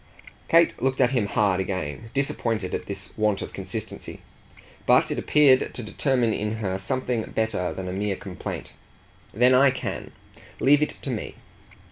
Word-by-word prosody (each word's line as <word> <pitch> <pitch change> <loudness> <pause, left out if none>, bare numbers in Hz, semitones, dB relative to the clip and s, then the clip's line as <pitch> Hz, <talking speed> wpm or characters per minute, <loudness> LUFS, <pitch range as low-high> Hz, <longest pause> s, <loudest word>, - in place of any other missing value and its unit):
Kate 165 0 +4
looked 130 0 0
at 125 -1 +4
him 120 -6 +1
hard 100 -2 +2
again, 95 +1 -3
disappointed 115 -7 -1
at - - -3
his - - -6
want 105 -2 +1
of - - -8
consistency; - - -6 0.7
but - - +5
it - - -1
appeared 140 -4 +4
to 120 - -2
determine 120 +1 +1
in 105 +1 -2
her 100 -4 -2
something 125 +4 -1
better 110 -5 0
than 95 -1 -5
a 90 - -3
mere 100 +1 -1
complaint. 95 -1 -7 0.6
"Then 125 +4 +4
I 135 +2 +6
can! 130 0 -4 0.5
Leave 145 +2 +5
it 150 - -1
to 135 - -2
me." 115 - -4
110 Hz, 160 wpm, -25 LUFS, 100-130 Hz, 0.7 s, I